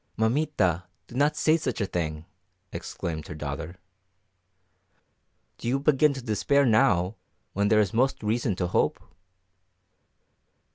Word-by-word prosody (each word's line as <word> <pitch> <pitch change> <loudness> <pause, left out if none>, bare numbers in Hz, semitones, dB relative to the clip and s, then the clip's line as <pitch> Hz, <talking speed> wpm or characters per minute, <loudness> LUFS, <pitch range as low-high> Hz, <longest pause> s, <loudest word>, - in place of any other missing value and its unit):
"Mamita, 110 - +1 0.2
do - - -15
not 145 +4 +2
say 155 +1 +3
such 130 -6 -3
a 100 - +1
thing!" 80 -4 -3 0.5
exclaimed 80 -3 -5
her - - -7
daughter. 75 +3 -5 1.8
"Do - - -5
you 130 +3 +1
begin 150 +1 +4
to 135 - -7
despair 135 +5 +2
now 100 -4 +3 0.4
when 100 +1 +1
there 110 +1 +4
is 100 -4 +1
most 130 +1 +1
reason 110 -1 0
to 90 - -1
hope?" 90 - +1
110 Hz, 130 wpm, -26 LUFS, 90-135 Hz, 1.8 s, begin